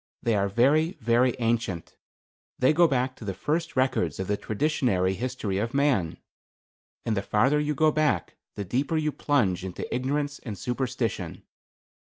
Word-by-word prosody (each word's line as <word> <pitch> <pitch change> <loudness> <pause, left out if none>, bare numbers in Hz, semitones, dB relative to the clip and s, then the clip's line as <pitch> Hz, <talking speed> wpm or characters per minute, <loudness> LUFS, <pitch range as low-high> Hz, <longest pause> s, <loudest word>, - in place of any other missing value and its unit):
They 115 - +2
are 100 -1 +1
very, 145 - +3
very 120 - +2
ancient. 115 -8 -1 0.6
They 130 +4 +4
go 170 +2 +5
back 130 -2 0
to - - -10
the 100 -3 -4
first 160 +2 -2
records 125 - +1
of 95 - -1
the 105 - 0
traditionary 110 -6 0
history 115 -3 -3
of 115 +5 -2
man. 130 - +1 0.9
And 110 - 0
the 95 - 0
farther 130 +9 +2
you 150 0 -1
go 155 +2 +4
back 145 - 0 0.2
the 100 - -4
deeper 135 - 0
you 155 -1 0
plunge 105 -13 +1
into 95 -2 -5
ignorance 140 +3 -1
and 110 -6 -7
superstition. 125 +4 -3
125 Hz, 160 wpm, -26 LUFS, 105-145 Hz, 0.9 s, go